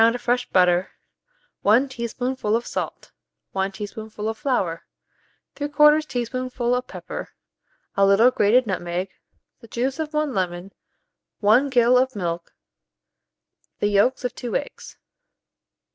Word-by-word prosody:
of 230 +2 +4
fresh 245 +1 0
butter, 180 0 +3 0.7
1 235 +7 +4
teaspoonful 245 -2 -2
of 235 +1 -1
salt, 180 -4 -5 0.4
1 195 0 -1
teaspoonful 215 +1 -6
of 220 - -2
flour, 220 - -1 0.7
3/4 300 +1 +4
teaspoonful 250 -1 -2
of 250 0 -1
pepper, - - -7 0.7
a 195 - +3
little 200 +6 +6
grated 240 +3 +3
nutmeg, 180 -1 -3 0.5
the 230 - -15
juice 255 +6 -2
of 310 -1 -3
1 300 -2 -1
lemon, 180 0 -3 0.7
1 230 +7 +4
gill 250 -1 +4
of 260 -1 0
milk, 170 -3 -4 1.2
the 205 - +1
yolks 210 +6 +2
of 250 - -2
2 240 -3 -5
eggs. - - -5
235 Hz, 125 wpm, -23 LUFS, 200-255 Hz, 1.2 s, little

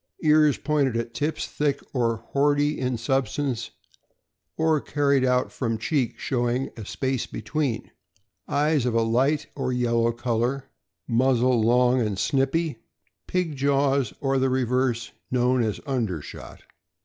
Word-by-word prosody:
Ears 150 -2 +5
pointed 140 -5 +1
at 115 0 -4
tips, 150 +6 -2
thick 145 -2 -1
or 115 -4 0
boardy 145 +1 +2
in 125 -2 -1
substance, 130 0 -1 0.9
or 160 -2 +2
carried 140 -2 +1
out 125 0 +1
from 115 -4 -2
cheek, 125 +1 -1
showing 125 +1 -1
a 110 -4 -8
space 130 -2 -2
between. 145 -7 -3 0.6
Eyes 145 -3 +1
of 120 - 0
a 115 - +3
light 130 +6 +1
or 130 -2 -2
yellow 120 -1 +1
color. 120 +3 -1 0.4
Muzzle 125 0 +3
long 125 +2 +3
and 105 -4 -1
snipy. 140 - 0 0.5
Pig 180 -5 -1
jaws 140 -2 +1
or 135 -1 +1
the 130 0 +2
reverse, 125 -2 0 0.2
known 125 0 +2
as 110 -3 -1
under 115 - -1
shot. - - -11
130 Hz, 135 wpm, -25 LUFS, 120-140 Hz, 0.9 s, Ears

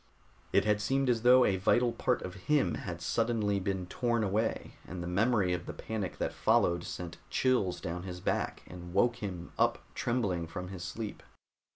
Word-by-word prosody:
It - - +3
had 105 -1 +2
seemed 135 +3 +2
as 115 -2 0
though 125 +1 +7
a 95 - +2
vital 120 +6 +3
part 125 +1 0
of 90 - -5 0.2
him 150 -2 +3
had 85 -2 -5
suddenly 110 -2 +1
been 95 -1 -2
torn 120 +4 0
away, 105 +3 -1
and 90 -1 -5
the - - -4
memory 100 0 +2
of 90 -1 -4
the - - -4
panic 105 -4 -4
that - - -2
followed 85 0 +2
sent 85 -2 -6
chills 125 -9 +1
down 85 +1 -4
his 90 -1 -6
back - - -1
and 90 0 -9
woke 120 +4 +3
him 90 -4 -6
up - - +3 0.2
trembling 100 -9 -1
from 90 +2 -6
his 95 -2 -7
sleep. 110 +3 -5
100 Hz, 185 wpm, -31 LUFS, 90-115 Hz, 0.2 s, though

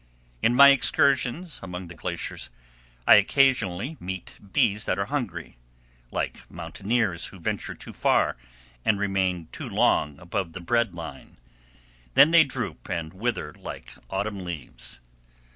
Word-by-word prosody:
In 120 - +3
my 140 +2 +10
excursions 140 +4 +3
among 90 -1 -6
the 85 - -9
glaciers 80 - -4 0.6
I - - +9
occasionally 125 - +2
meet 95 0 -7
bees 105 +3 +2
that - - 0
are 100 - 0
hungry, 100 - -4 0.5
like - - -4
mountaineers 100 -5 -1
who 95 - -12
venture 80 - -3
too - - -9
far - - +2 0.5
and 105 - +2
remain 95 -4 0
too - - -6
long 75 -1 +2
above 85 -1 -3
the - - -6
bread 115 +1 0
line; 80 -5 -9 0.8
then 155 - +8
they 170 -1 +8
droop 135 - -4
and 80 -1 -3
wither 115 +5 -2
like - - -9 0.2
autumn 100 0 -3
leaves. 80 -7 -7
100 Hz, 135 wpm, -26 LUFS, 85-125 Hz, 0.8 s, my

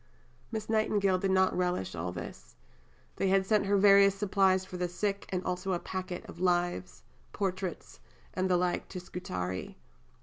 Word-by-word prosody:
Miss 220 -2 -4
Nightingale 205 -4 +2
did 195 - 0
not 190 0 +3
relish 180 - -1
all 85 +1 -3
this. 90 - -9 0.6
They 195 - +1
had 190 0 +3
sent 210 0 +2
her 200 0 +3
various 200 0 +6
supplies 190 -2 +2
for 185 - -9
the 180 0 -1
sick, 200 +3 -2
and 185 -1 -2
also 185 +1 -2
a 175 - 0
packet 185 -1 -5
of - - -11
"Lives," 175 - 0 0.3
"Portraits," 185 -2 -3 0.3
and 185 0 0
the 180 - +4
like 180 0 -1
to 185 - -6
Scutari. 95 - -5
185 Hz, 165 wpm, -30 LUFS, 180-195 Hz, 0.6 s, various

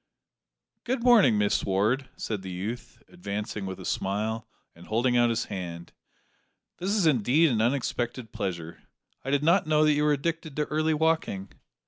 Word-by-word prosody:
"Good 245 -1 -2
morning, 220 - +6
Miss 105 0 +1
Ward!" 110 +8 0
said 105 -3 -3
the 95 - -7
youth, 110 +6 -6
advancing 105 - -5
with 95 - -6
a - - -9
smile, 110 +3 -2 0.3
and 85 +1 -15
holding 120 +3 +1
out 120 0 +4
his 115 0 -1
hand; 85 -4 -7 0.9
"this 185 - -2
is 205 -3 +2
indeed 145 +3 +4
an 110 -2 +1
unexpected 120 -1 -1
pleasure; 85 -4 -5 0.4
I 135 - -4
did 145 +1 +1
not 170 +1 +3
know 155 0 +4
that 150 - +4
you 150 0 +1
were 150 - +3
addicted 160 0 -3
to 150 - 0
early 155 +1 0
walking." 155 -12 0
120 Hz, 165 wpm, -27 LUFS, 100-155 Hz, 0.9 s, morning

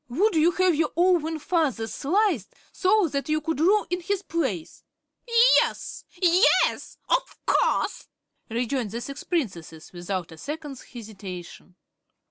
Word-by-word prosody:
"Would 385 - +2
you 320 +2 +5
have 370 -1 +3
your 315 0 0
own 340 -3 +2
father 300 -7 0
sliced, 325 - 0 0.2
so 400 0 +2
that 280 +1 -3
you 310 0 +2
could 315 -1 -3
rule 395 +6 +3
in 360 0 -1
his 395 +2 -2
place?" 260 - -3 0.8
"Yes, - - -4
yes; 360 +3 +3
of - - 0
course!" - - +1 0.4
rejoined 240 0 -2
the 230 +4 -5
six 275 +3 -7
Princesses, 175 - -4
without 175 0 -4
a 160 - -12
second's 295 - -6
hesitation. 190 -6 -10
300 Hz, 130 wpm, -25 LUFS, 225-355 Hz, 0.8 s, you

